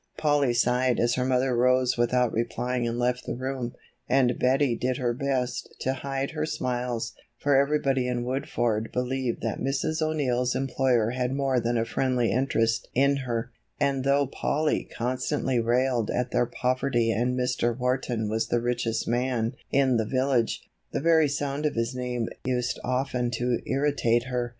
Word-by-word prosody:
Polly 145 -4 +2
sighed 125 +1 +2
as 120 0 +2
her 125 - 0
mother 130 0 +2
rose 125 +1 +3
without 120 0 +2
replying 120 +2 -1
and 115 0 -2
left 125 +1 -1
the - - -2
room, 130 -1 -4 0.3
and 125 -1 +3
Betty 130 -1 +2
did 125 +2 -1
he - - -7
her 120 -1 +1
best 130 -1 -2
to 130 - 0
hide 135 +1 -3
her 155 -1 -2
smiles, 125 -5 -2 0.2
for 145 +3 +2
everybody 135 -2 +2
in 120 -1 -1
Woodford 120 -3 -1
believed 125 -1 -2
that 115 -2 -2
Mrs. 140 +4 -1
O'Neill's 130 -6 0
employer 130 -4 +1
had 125 0 -1
more 135 -2 +1
than 120 0 0
a 115 - +1
friendly 125 -1 0
interest 115 -3 +1
in 140 +2 +3
her, 120 -2 -3 0.3
and 140 -2 +1
though 140 +1 +3
Polly 150 +3 -1
constantly 125 +1 -1
railed 120 -1 +1
at 125 0 -1
their 120 - +2
poverty 125 -1 0
and 120 +4 0
Mr. 125 -2 0
Wharton 125 -3 -1
was 110 +1 -1
the 120 - +1
richest 120 -1 -1
man 120 -1 0 0.2
in 130 -3 +3
the 110 - 0
village, 130 -1 0 0.2
the - - -1
very 160 0 +4
sound 145 +1 -1
of - - -3
his 115 +2 -1
name 125 -2 -2 0.2
used 125 -1 -1
often 125 -1 -1
to 120 +1 0
irritate 135 -4 +1
her. 125 -2 -2
125 Hz, 165 wpm, -26 LUFS, 120-135 Hz, 0.3 s, very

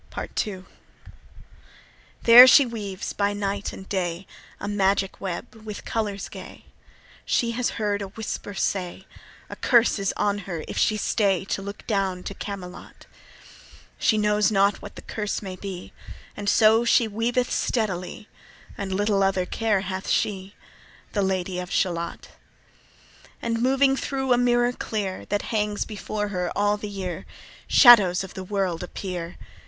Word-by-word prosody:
Part - - -3
II. 190 -3 -7 1.6
There 240 +2 +11
she 275 +1 +7
weaves 205 -5 -5
by 205 0 0
night 200 0 -3
and 190 - -10
day 180 -1 -2 0.3
A - - -5
magic 195 -1 0
web 190 +6 -5
with 215 -2 -9
colours 205 -3 -3
gay. - - -11 0.6
She 235 -1 +1
has 245 +1 -1
heard 205 -2 -1
a 200 - -4
whisper 205 0 -6
say, 185 0 -2 0.4
A - - -8
curse 235 -3 +3
is 195 -1 0
on 205 0 0
her 165 -3 -4
if - - -6
she 215 - +2
stay 195 -3 +1
To 195 - -3
look 200 +1 -8
down 195 -4 -1
to - - -5
Camelot. 195 -3 -8 0.9
She 220 - +3
knows 210 -1 +2
not 200 0 +2
what 205 - -10
the - - -10
curse 210 -1 -4
may 190 -2 -6
be, 185 -2 -8 0.4
And 205 -1 -2
so 220 +2 +5
she 235 -1 +3
weaveth 235 +4 -1
steadily, 205 -3 -2 0.5
And 195 -1 -4
little 200 +1 +1
other 195 -1 +1
care 210 +1 0
hath 190 0 -5
she, 195 -1 -1 0.6
The 205 - +1
Lady 185 -1 -1
of 180 0 -6
Shalott. 170 -3 -2 1.1
And 230 0 -2
moving 270 +2 +3
thro' 265 -1 -1
a - - +3
mirror 240 0 +3
clear 205 -6 -4
That 205 - -1
hangs 210 -1 0
before 210 -1 -4
her 180 -3 -2
all 205 0 +2
the 210 0 -6
year, 190 -3 -5 0.4
Shadows 205 -8 +7
of 190 - -9
the 190 - -6
world 185 -3 -2
appear. 180 -1 -6
205 Hz, 150 wpm, -24 LUFS, 190-220 Hz, 1.6 s, There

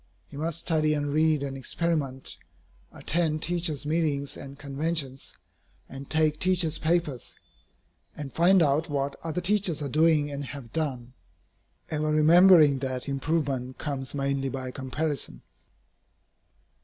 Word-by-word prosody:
He - - -12
must 160 +3 -3
study 155 -2 +1
and 145 -1 -2
read 155 -1 +2
and 135 -1 -4
experiment, 135 -1 -2 0.6
attend 155 -1 -1
teachers' 165 -4 0
meetings 150 -3 0
and 140 0 -10
conventions, 145 -1 -2 0.5
and 135 +1 -10
take 155 -1 +2
teachers' 180 -4 +2
papers, 155 -6 -1 0.8
and 145 -3 -7
find 180 +1 +5
out 150 +3 +1
what 140 -1 -2
other 165 +2 -3
teachers 185 -3 +2
are 140 - -3
doing 155 0 +3
and 140 0 -4
have 130 -3 -9
done, 130 -6 -3 0.8
ever 155 0 -1
remembering 155 -2 +6
that 130 -1 -3
improvement 140 -3 -2
comes 140 -3 -4
mainly 140 -1 -1
by 130 -1 -5
comparison. 135 - -3
150 Hz, 125 wpm, -27 LUFS, 135-160 Hz, 0.8 s, remembering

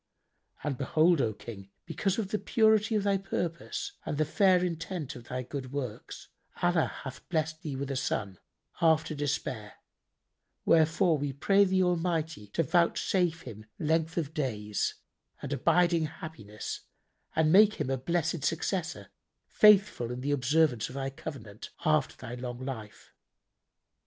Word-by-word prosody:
And 135 -4 -2
behold, 155 +3 +3
O 110 - +1
King, 100 -2 -10 0.2
because 180 +4 -1
of 210 -4 -2
the 210 - -1
purity 220 -1 +3
of 210 - +1
thy 200 -1 +2
purpose 175 -3 -3
and 145 - -3
the 155 - +2
fair 185 +2 +3
intent 165 -3 -4
of 120 -2 -11
thy 125 +1 -4
good 130 0 -6
works, 130 -6 -6 0.3
Allah 175 -2 +3 0.2
hath 130 -1 -9
blessed 160 -1 -1
thee 145 -4 -4
with 140 +1 -3
a - - -2
son, 100 -7 -2 0.4
after 160 -1 +3
despair: 130 -7 -3 0.9
wherefore 165 0 +4
we 145 0 -2
pray 200 +8 +4
the 185 0 +2
Almighty 165 -8 -1
to 165 +11 0
vouchsafe 170 +1 +1
him 110 0 -10
length 160 +1 0
of 160 -3 -2
days 105 - -2 0.4
and - - -4
abiding 170 -3 +3
happiness 110 -10 -7 0.6
and 160 -1 +3
make 210 +3 +7
him 130 - -2
a 135 - +1
blessed 165 +1 -1
successor, 175 +2 -2 0.4
faithful 200 - +5
in 125 +1 -5
the 140 +2 -1
observance 145 -3 +2
of 130 - -10
thy 135 0 -3
covenant, 130 -8 -8 0.2
after 155 -3 +2
thy 115 - -8
long 125 0 -6
life." 110 -6 -8
155 Hz, 145 wpm, -29 LUFS, 130-175 Hz, 0.9 s, make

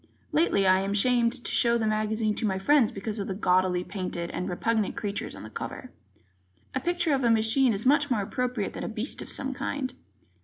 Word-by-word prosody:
Lately, 300 - +3
I 185 0 +5
am 195 +1 -1
ashamed 240 +3 +2
to - - 0
show 235 -1 +3
the 225 - -1
magazine 215 0 0
to 220 - -1
my 190 -1 0
friends 260 +4 +3
because 210 +2 -5
of 200 - -3
the 190 - -3
gaudily 180 -2 +2
painted 180 -3 -4
and 180 - -3
repugnant 215 +3 0
creatures 205 -1 -3
on - - -10
the 110 - -8
cover. - - -7 0.8
A 260 - 0
picture 345 +1 0
of 270 -1 +1
a 235 - +4
machine 225 +3 +3
is 205 +2 -3
much 290 +2 +4
more 220 -5 +1
appropriate 250 0 -2
than - - -5
a - - -3
beast 225 +4 -4
of - - -8
some 270 0 -1
kind. 275 -1 -3
220 Hz, 215 wpm, -27 LUFS, 195-255 Hz, 0.8 s, I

